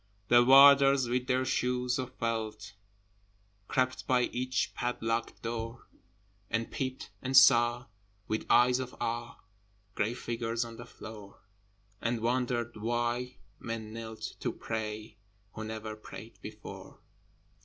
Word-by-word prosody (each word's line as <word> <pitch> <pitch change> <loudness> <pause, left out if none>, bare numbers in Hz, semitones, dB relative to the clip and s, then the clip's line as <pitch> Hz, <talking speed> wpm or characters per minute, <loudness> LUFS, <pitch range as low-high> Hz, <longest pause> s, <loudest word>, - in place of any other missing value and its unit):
The 120 0 +7
Warders 135 0 +7
with 125 +1 -1
their 130 0 +1
shoes 125 -1 0
of 130 0 -5
felt 110 -2 -3 0.9
Crept 130 0 0
by 125 -1 +3
each 125 +1 -1
padlocked 115 -1 -2
door, 115 +1 -5 0.6
And 115 0 -2
peeped 130 -4 -4
and 130 0 +2
saw, 120 -2 +6 0.4
with 110 - -2
eyes 125 +1 +5
of 130 -1 -5
awe, 115 0 -3 0.6
Grey 110 +4 -1
figures 115 0 -2
on 115 -1 -10
the 120 - -9
floor, 105 -4 -11 0.6
And 115 0 0
wondered 120 0 -1
why 120 +2 -1 0.2
men 110 -2 -5
knelt 110 -1 -7
to - - -1
pray 110 -1 -5 0.4
Who 110 - -6
never 110 0 -5
prayed 110 - -11
before. - - -10
120 Hz, 120 wpm, -30 LUFS, 115-125 Hz, 0.9 s, The